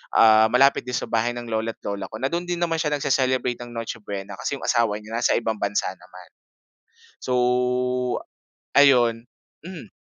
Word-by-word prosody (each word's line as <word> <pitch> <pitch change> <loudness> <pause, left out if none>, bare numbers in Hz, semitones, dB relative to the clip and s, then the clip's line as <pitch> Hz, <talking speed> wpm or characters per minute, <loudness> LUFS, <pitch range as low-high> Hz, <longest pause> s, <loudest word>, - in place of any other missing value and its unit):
ah, 110 0 +6
malapit 135 +3 +4
din 125 - -4
sa - - -4
bahay 115 +1 +1
ng 120 -1 -7
lolo't 110 0 -3
lola 100 -1 -4
ko - - -6
na 135 - 0
dun 170 +1 -1
din 175 -1 -2
naman 165 -1 +1
siya 150 -2 -1
nagse-celebrate 130 -3 0
ng 120 - -11
Noche 115 -1 -5
Buena 100 -1 -6
kasi - - -4
yung - - -7
asawa 110 -3 +2
niya 110 +2 -8
nasa 120 - +1
ibang 110 -1 -2
bansa 100 -1 0
naman. 90 0 -15 0.9
So 125 - -3 1.4
ayun, 120 -4 +4 0.4
hmm. 165 - -9
115 Hz, 175 wpm, -23 LUFS, 110-130 Hz, 1.4 s, ah